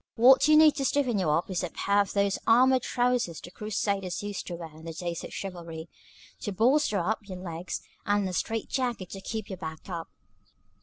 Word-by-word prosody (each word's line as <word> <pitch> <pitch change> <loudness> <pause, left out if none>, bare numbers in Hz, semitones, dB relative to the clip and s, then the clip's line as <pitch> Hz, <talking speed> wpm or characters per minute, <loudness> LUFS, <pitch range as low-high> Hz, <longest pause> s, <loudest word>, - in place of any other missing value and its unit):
What 265 +4 +7
you 305 0 +7
need 310 -1 +7
to 275 - -1
stiffen 255 -6 +1
you 180 -5 +1
up 160 +4 +1
is 185 0 -1
a 180 - -2
pair 200 +4 +1
of 200 - -3
those 200 -1 +1
armored 255 +3 +5
trousers 245 -9 0
the 175 - -11
Crusaders 200 -2 -2
used 205 -1 -5
to 175 - -4
wear 165 -2 -9
in 160 - -13
the 165 - -5
days 170 0 -4
of - - -7
chivalry, 170 -4 -6 0.5
to 205 - -4
bolster 235 +3 +3
up 205 +3 -2
your 185 - -5
legs, 175 -1 -5 0.2
and 205 -1 +1
a 185 - -4
strait 225 +5 -2
jacket 245 -8 -2
to 195 - -7
keep 220 +2 -4
your 190 - -6
back 160 +1 -7
up." 170 -2 -4
200 Hz, 210 wpm, -28 LUFS, 175-235 Hz, 0.5 s, What